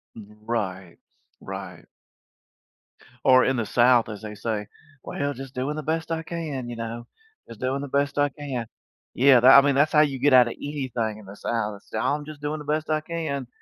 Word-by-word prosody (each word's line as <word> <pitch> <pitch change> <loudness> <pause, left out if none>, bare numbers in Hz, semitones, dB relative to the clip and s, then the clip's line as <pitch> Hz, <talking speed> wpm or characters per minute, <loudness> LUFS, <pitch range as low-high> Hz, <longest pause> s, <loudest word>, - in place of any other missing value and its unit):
Right, 105 -4 -5 0.4
right. - - -8 1.4
Or 130 -1 +6
in 130 - +1
the 115 -3 -1
South, 120 -1 +4
as 105 -1 -7
they 105 0 -6
say, 105 0 -3 0.4
"Well, 145 0 -3
just 135 0 -9
doing 135 +4 -2
the 155 - -5
best 160 +2 -2
I 160 0 -2
can, 155 -7 -5
you 120 - -5
know, 115 +1 -6 0.4
just 115 - -11
doing 130 +2 -1
the 140 - -5
best 140 +1 0
I 145 0 +3
can." 135 -4 -5 0.5
Yeah, 130 -1 +6
that 130 +2 +9
I - - +6
mean, 140 -1 +2
that's 145 +3 +3
how 150 - +6
you 140 -3 +1
get 140 0 +3
out 125 -2 +7
of - - -4
anything 125 -7 -4
in 105 - -14
the 100 +2 -11
South. 105 -3 -3
Say, 110 - -5
"I'm 145 +5 -1
just 150 -1 -10
doing 150 +1 -2
the 150 - -9
best 155 +1 -1
I 155 0 +1
can, 155 -6 -4
130 Hz, 205 wpm, -25 LUFS, 115-145 Hz, 1.4 s, that